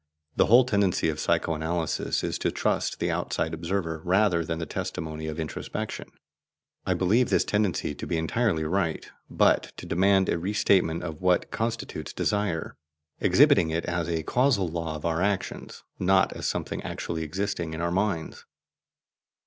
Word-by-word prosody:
The - - +3
whole 120 +3 +7
tendency 100 -8 +1
of 75 -1 -3
psycho 80 - +1
analysis 80 +1 -1
is - - -2
to - - +1
trust - - -1
the - - 0
outside 80 - -2
observer 85 -1 -2
rather 90 -2 +3
than 80 +1 -3
the 80 - -3
testimony 80 0 -5
of 80 +1 -5
introspection. 80 -1 -5 0.8
I - - +2
believe 110 +7 +2
this - - +2
tendency 105 -4 0
to - - -7
be 85 - 0
entirely 80 +1 0
right, 80 0 -1 0.2
but - - +2
to - - -8
demand 95 +2 +3
a 85 - 0
re 95 +5 -2
statement 90 -5 +2
of 80 -2 -6
what 90 -1 +2
constitutes 115 +1 -3
desire, 100 -6 -1 0.4
exhibiting 80 - +5
it 80 +1 -1
as 85 -1 -2
a 80 -1 -1
causal 120 - +2
law 80 -1 -3
of 75 - -7
our 85 0 0
actions, 100 0 -2 0.2
not 95 +1 +3
as - - -4
something - - -3
actually 80 -1 -4
existing 85 0 -3
in 80 - -4
our 85 0 0
minds. 95 -3 -2
85 Hz, 165 wpm, -26 LUFS, 80-100 Hz, 0.8 s, whole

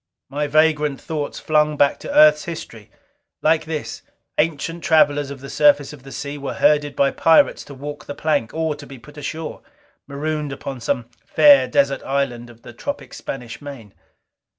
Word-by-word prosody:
My 145 +1 -2
vagrant 150 -1 +2
thoughts 150 -3 -4
flung 150 -1 +1
back 140 0 +4
into - - -7
Earth's 150 0 +6
history. 120 -10 -8 0.5
Like 160 0 +3
this, 155 -1 -5 0.4
ancient 165 +2 -1
travelers 145 -3 +3
of 140 -2 -8
the 135 - -8
surface 145 -1 +3
of 145 - -12
the 135 +1 -12
sea 145 +1 -6
were 135 -2 -5
herded 145 -1 +2
by 140 0 +2
pirates 165 -1 +3
to 140 - -11
walk 145 +2 -8
the 145 - -6
plank, 155 -8 0
or 160 -1 -1
be 140 -2 -11
put 145 +5 -16
ashore, 155 +2 -6 0.5
marooned 150 +1 -3
upon 135 -1 -6
some 115 0 -2 0.2
fair 285 -2 +6
desert 275 - +1
island 130 -3 -2
of 115 0 -17
the - - -11
tropic - - -6
Spanish 125 -2 -7
main. 135 -8 -10
145 Hz, 170 wpm, -21 LUFS, 140-155 Hz, 0.5 s, Earth's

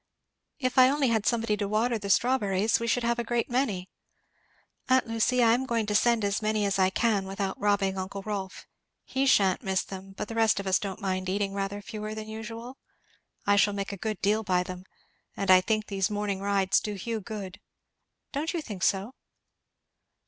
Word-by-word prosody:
If 255 -1 +1
I 255 0 +8
only 280 -2 +2
had 220 -3 +1
somebody 230 -3 +1
to 205 -1 -2
water 225 +3 +1
the 200 -1 -6
strawberries! 210 -3 +2
we 230 - -3
should 240 +1 +1
have 235 0 +1
a - - 0
great 240 +1 -1
many. 220 -8 0 1.0
Aunt 260 0 +4
Lucy, 230 +2 +1
I 225 -1 +5
am 260 +2 0
going 230 -3 0
to 210 - -2
send 230 0 +3
as 200 +1 0
many 215 -1 +1
as 195 -1 0
I 185 0 +4
can 205 -2 +1
without 195 0 -3
robbing 200 -2 +1
uncle 195 +1 -5
Rolf 200 -3 -5 0.4
he 270 +1 0
sha'n't 195 -7 +4
miss 190 -1 0
them; 195 0 -9
but 200 - -5
the - - -6
rest 225 -2 +3
of 200 - -5
us 190 -1 +3
don't 195 -2 -5
mind 185 -2 -2
eating 195 +1 -1
rather 200 +1 -3
fewer 215 +1 -6
than 215 0 -6
usual? 225 +4 -8 0.7
I 205 - +4
shall 205 0 +3
make 200 0 -3
a - - -4
good 215 +2 -4
deal 210 +2 +3
by 185 -4 +1
them. 185 0 -8 0.5
And 195 -1 +2
I 185 0 +8
think 215 +2 0
these 195 -2 -1
morning 205 -2 -2
rides 195 -1 +2
do 210 -1 -4
Hugh 220 +3 -4
good; 200 -1 -7 0.7
don't 300 +5 -2
you 335 - -1
think 205 -8 -7
so?" 200 +6 +1
210 Hz, 200 wpm, -28 LUFS, 195-230 Hz, 1.0 s, I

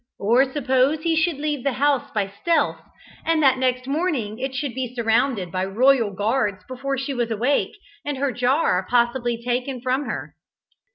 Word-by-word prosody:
Or 245 +6 +3
suppose 265 +2 +1
he 330 -1 +2
should 335 -2 +1
leave 295 -2 -2
the 275 - 0
house 280 +1 +1
by 205 -3 -1
stealth, 335 -1 +1 0.4
and 325 -1 +1
that 265 -2 +4
next 255 -1 0
morning 275 - -1
it 265 0 -3
should 255 -1 -2
be 250 0 -4
surrounded 225 -5 +1
by 185 0 -1
royal 230 +3 +3
guards 205 -1 -1
before 270 +2 -3
she 270 +2 -3
was 240 -2 -1
awake, 245 - 0 0.3
and 290 -1 -3
her 275 0 0
jar 245 - +1
possibly 240 0 +1
taken 250 +2 -2
from 260 +3 -1
her. - - -5
255 Hz, 170 wpm, -23 LUFS, 235-280 Hz, 0.4 s, that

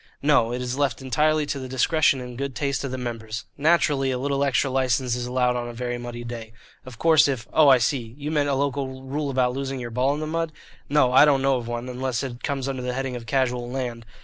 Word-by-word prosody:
"No; 140 -6 +4
it 125 +1 -3
is 125 +2 -3
left 140 -5 +1
entirely 150 +3 +1
to 145 -1 -3
the 130 - -6
discretion 135 +2 +2
and 125 -1 -8
good 135 0 -4
taste 140 -1 -1
of 135 - -3
the 130 - -4
members. 115 -3 -5
Naturally 145 -3 +2
a 130 - 0
little 140 +2 0
extra 135 -1 +1
license 130 -2 +1
is 125 0 -3
allowed 125 0 +1
on 120 -1 -3
a - - -7
very 120 0 -3
muddy 120 0 -6
day. 115 -2 -7 0.3
Of 125 -3 -10
course, 160 0 +5
if 130 -5 -3
Oh, 155 -2 +6
I 130 - +8
see. 120 -1 -1
You 150 +1 -4
meant 145 -2 +1
a 140 - +1
local 135 -1 -2
rule 140 +2 -3
about 125 -2 +1
losing 135 0 -3
your 120 -1 -6
ball 130 +4 +1
in - - -5
the 155 - -3
mud? 165 0 -2 0.4
No, 140 -3 +3
I 135 - +8
don't 140 -3 +4
know 135 -1 +3
of 120 -2 -6
one, 120 +1 -4
unless 125 0 -2
it 120 -2 -6
comes 135 -2 -2
under 135 -2 -3
the 125 0 -3
heading 135 0 -3
of 115 -2 -8
casual 125 -1 0
land. 125 -3 -4
130 Hz, 250 wpm, -24 LUFS, 125-140 Hz, 0.4 s, I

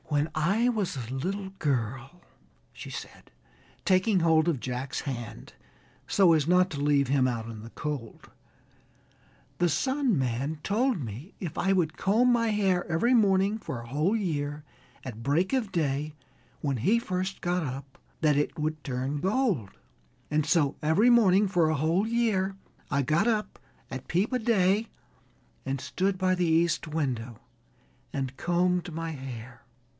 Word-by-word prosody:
"When 145 +1 0
I 195 +10 +2
was 210 - -1
a 125 0 -5
little 190 +8 -3
girl," 135 +3 -2 0.5
she - - -9
said, - - -9 0.5
taking 190 +1 +3
hold 160 0 +4
of 150 -7 0
Jack's 130 +2 -4
hand 120 - -6 0.5
so 185 -4 +5
as 155 -2 +2
not 180 +1 +4
to 145 -3 -4
leave 145 -2 +3
him 130 -1 +3
out 115 -2 -3
in 115 -2 -8
the 115 - -9
cold, 140 -4 -6 1.3
"the 175 0 +3
Sun 260 - +1
Man 135 +4 -1
told 230 +1 +1
me 125 - -7
if 170 -6 -5
I 195 - +1
would 175 -5 +1
comb 230 +6 +3
my 230 -1 +2
hair 195 -4 +2
every 205 +11 +2
morning 200 -2 +3
for 130 - -6
a 120 - -9
whole 155 - +1
year, 150 -7 -2 0.4
at 115 -3 -7
break 165 - +1
of 240 -7 0
day, 150 -3 -1 0.5
when 140 -3 -1
he 205 - +3
first 185 -2 -3
got 175 0 0
up, 135 -1 -6 0.2
that 150 -2 +3
it 145 +2 -1
would 155 0 -2
turn 135 +2 -3
gold. 190 - +1 0.6
And 150 0 +1
so 160 -3 +2
every 160 +11 +4
morning 205 -4 +5
for 175 -4 +2
a 155 - +1
whole 165 +8 +1
year 210 -5 0 0.3
I 140 0 +1
got 155 - +2
up 215 -2 -1 0.3
at 130 -1 -7
peep 195 +9 +1
o' 250 - +2
day 215 -1 +2 0.8
and 135 0 -2
stood 190 +7 -1
by 185 0 +2
the 180 -1 +1
east 165 +1 +2
window 130 -7 -3 0.7
and 135 -2 -3
combed 180 +2 0
my 165 0 -3
hair." 130 -3 -8
160 Hz, 160 wpm, -28 LUFS, 135-195 Hz, 1.3 s, so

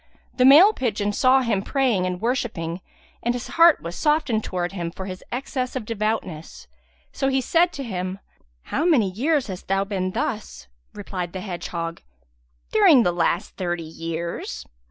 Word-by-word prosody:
The 255 - +3
male 325 +11 +8
pigeon 210 - -1
saw 260 +4 +4
him 220 -5 0
praying 235 -7 +1
and 180 -1 -3
worshipping, 195 -8 -2 0.4
and 240 +1 0
his 245 - -6
heart 335 -1 +5
was 170 +1 -5
softened 300 -8 +1
towards 180 0 -3
him 170 -3 -3
for 190 +2 -8
his 185 -1 -7
excess 255 0 -3
of 250 -4 -3
devoutness; 215 -7 -3 0.5
so 270 - -1
he 270 0 +2
said 335 +7 +2
to 275 - -5
him, 185 -4 -4 0.6
"How 295 - +1
many 260 - +3
years 275 - +1
hast 185 -3 -8
thou 195 +1 +1
been 195 -2 -2
thus?" 220 - -4 0.3
Replied 185 -4 -5
the 185 - -5
hedgehog, 170 -3 -5 0.7
"During 360 - +6
the 175 - +2
last 170 0 -1
thirty 175 -2 -2
years." 165 +1 -5
210 Hz, 160 wpm, -23 LUFS, 180-265 Hz, 0.7 s, male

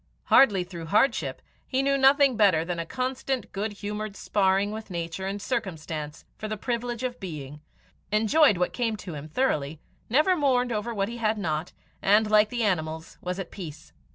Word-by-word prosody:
Hardy 205 -9 +5
through 170 -2 -8
hardship, 215 +10 +1 0.2
he 265 0 0
knew 275 0 +2
nothing 275 -1 +5
better 190 -7 +4
than 175 -1 -3
a 165 - -4
constant 260 +2 -3
good 210 +2 -2
humoured 210 0 -5
sparring 195 0 +1
with 215 0 -7
nature 170 +1 -4
and 200 +1 -3
circumstance 160 - -4
for 215 - -4
the 215 0 -3
privilege 240 +2 -3
of 250 -1 -3
being, 150 -6 -7 0.5
enjoyed 220 - +4
what 180 - 0
came 230 -3 -1
to 185 -4 -8
him 150 0 -7
thoroughly, 155 - -1 0.3
never 305 +10 +4
mourned 255 -5 +2
over 215 +1 -2
what 200 -3 -1
he 235 +2 -6
had 220 -1 0
not, 160 -4 -2 0.3
and, 210 +2 +4
like 210 0 +5
the 240 -1 -1
animals, 160 -5 -2
was 180 0 -3
at 195 - -6
peace. 160 -5 -9
210 Hz, 180 wpm, -26 LUFS, 175-240 Hz, 0.5 s, Hardy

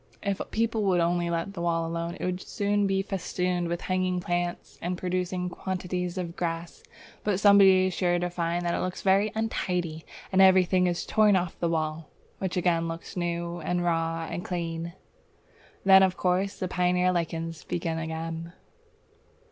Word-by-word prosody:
If 200 -2 -1
people 225 0 0
would 185 -2 +3
only 170 0 +1
let 170 +3 -2
the 175 - -5
wall 165 -1 0
alone, 170 +1 -3
it - - -3
would 180 0 -2
soon 205 0 0
be 195 0 +1
festooned 180 -2 -2
with 170 0 -3
hanging 185 -1 0
plants, 175 -1 -3
and 180 +1 -2
producing 180 0 -2
quantities 180 -1 -3
of 175 -2 -4
grass, 170 -1 -4 0.4
but 205 -3 +1
somebody 195 -2 +7
is 185 - -1
sure 175 0 +1
to 175 0 -2
find 175 0 -1
that 170 - +1
it - - -1
looks 185 0 -4
very 195 +2 +3
untidy, 180 -7 -2 0.3
and 190 0 +4
everything 185 -1 +5
is 175 -1 -1
torn 215 -2 +4
off 180 -2 -1
the 170 - 0
wall, 155 -1 -2 0.3
which 190 -1 -2
again 170 -2 +2
looks 165 0 -7
new 170 -1 -2
and 175 +2 -1
raw 165 -1 0
and 175 - -4
clean. 170 -1 -4 0.9
Then 190 0 +8
of 190 -1 +2
course 185 +2 0
the 185 - -2
pioneer 180 0 +2
lichens 165 -1 -3
begin 165 -1 -2
again! 165 +1 -5
180 Hz, 170 wpm, -27 LUFS, 170-185 Hz, 0.9 s, Then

